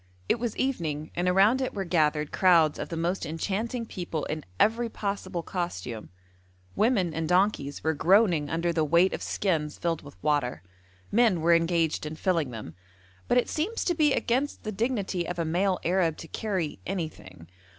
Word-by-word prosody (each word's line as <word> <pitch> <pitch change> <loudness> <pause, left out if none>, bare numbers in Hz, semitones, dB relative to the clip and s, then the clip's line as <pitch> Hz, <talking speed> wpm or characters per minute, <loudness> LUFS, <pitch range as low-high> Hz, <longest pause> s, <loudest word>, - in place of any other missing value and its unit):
It 235 - +1
was 235 -2 -3
evening, 160 - -2
and 180 +1 +1
around 200 +8 +4
it 260 - -2
were 195 -1 -2
gathered 155 -3 +1
crowds 170 -5 +4
of - - -4
the 165 - -4
most 175 +3 -1
enchanting 210 +9 -2
people 175 -7 -4
in 155 -1 -4 0.2
every 230 +2 +3
possible 200 -5 -3
costume. 120 - -4 0.7
Women 205 -8 +2
and 160 0 -2
donkeys 180 -6 +1
were 160 - +2
groaning 170 -2 +3
under 170 +1 0
the 160 -1 +1
weight 170 +5 +3
of - - -4
skins 155 -7 -1
filled 170 -2 -1
with 145 -1 -13
water; 145 - 0 0.5
men 220 -5 +4
were 170 +1 +4
engaged 165 -2 +1
in 155 - -6
filling 165 -4 0
them, 110 -8 -8 0.5
but 245 - +3
it 245 - +3
seems 385 +10 -2
to 350 - +2
be 305 -3 +3
against 265 +5 -1
the 215 - -3
dignity 200 -5 -1
of 175 - -4
a 170 - -1
male 180 +3 +1
Arab 170 -2 +2
to 165 - -9
carry 185 -5 -3
anything. 155 - -6
175 Hz, 175 wpm, -27 LUFS, 155-205 Hz, 0.7 s, around